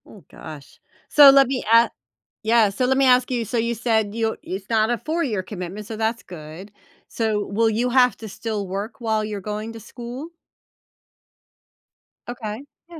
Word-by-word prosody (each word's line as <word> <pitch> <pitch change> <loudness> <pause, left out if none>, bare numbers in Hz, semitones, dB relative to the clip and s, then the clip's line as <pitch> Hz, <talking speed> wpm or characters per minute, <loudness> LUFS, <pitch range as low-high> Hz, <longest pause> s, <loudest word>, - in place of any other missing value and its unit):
Ooh 200 -5 -15
gosh. 145 -3 -12 0.3
So, 290 -2 +9
let 275 -1 +6
me 255 -1 -2
a 230 +1 +6 0.6
yeah, 225 -2 +4
so 250 +6 -1
let 265 +1 +2
me 275 - +4
ask 250 0 +4
you, 240 -2 -1
so 230 - -4
you 235 +1 0
said 220 -2 0
you 225 -1 -1
it's 195 +1 -6
not 220 0 +2
a 240 - 0
4 325 +6 -2
year 215 - -1
commitment, 190 +1 -7
so 220 - -6
that's 225 +1 -1
good. 170 +4 -11 0.4
So, 215 -3 -1
will 225 +3 +1
you 235 +3 0
have 250 0 +4
to 220 - -8
still 210 0 -4
work 205 +7 -5
while 220 -2 0
you're 210 -1 -5
going 210 +3 -5
to 225 - -9
school? 245 +7 -8 2.0
Okay, 230 0 -6 0.3
yeah. 335 -2 -10
225 Hz, 180 wpm, -22 LUFS, 210-245 Hz, 2.0 s, So